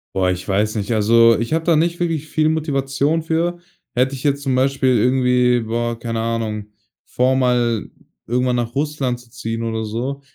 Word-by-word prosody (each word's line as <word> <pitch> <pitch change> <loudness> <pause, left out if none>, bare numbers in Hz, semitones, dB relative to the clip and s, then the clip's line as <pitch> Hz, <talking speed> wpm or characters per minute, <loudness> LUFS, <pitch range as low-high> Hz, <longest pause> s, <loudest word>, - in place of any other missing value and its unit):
Boah, 95 -1 +2
ich 90 0 -5
weiß 105 +3 0
nicht. 105 0 -3
Also, 115 +1 +5
ich 115 +6 -2
habe 160 0 0
da 170 - +4
nicht 170 +2 +1
wirklich 165 -3 -1
viel 155 0 +1
Motivation 145 0 0
für. 170 +2 -1 0.3
Hätte 130 +2 +1
ich 130 - -9
jetzt 140 -1 +1
zum 135 -2 0
Beispiel 130 -1 +2
irgendwie, 125 +1 +3
boah, 115 +1 -2
keine 115 -1 -3
Ahnung, 110 -2 -3 0.4
vor, 130 +1 +1
mal 120 -4 +1 0.4
irgendwann 125 +1 0
nach 120 -1 -2
Russland 140 -4 -1
zu 120 -1 -18
ziehen 115 +1 -4
oder 110 -1 -2
so, 125 +6 -4
125 Hz, 180 wpm, -20 LUFS, 115-140 Hz, 0.4 s, Also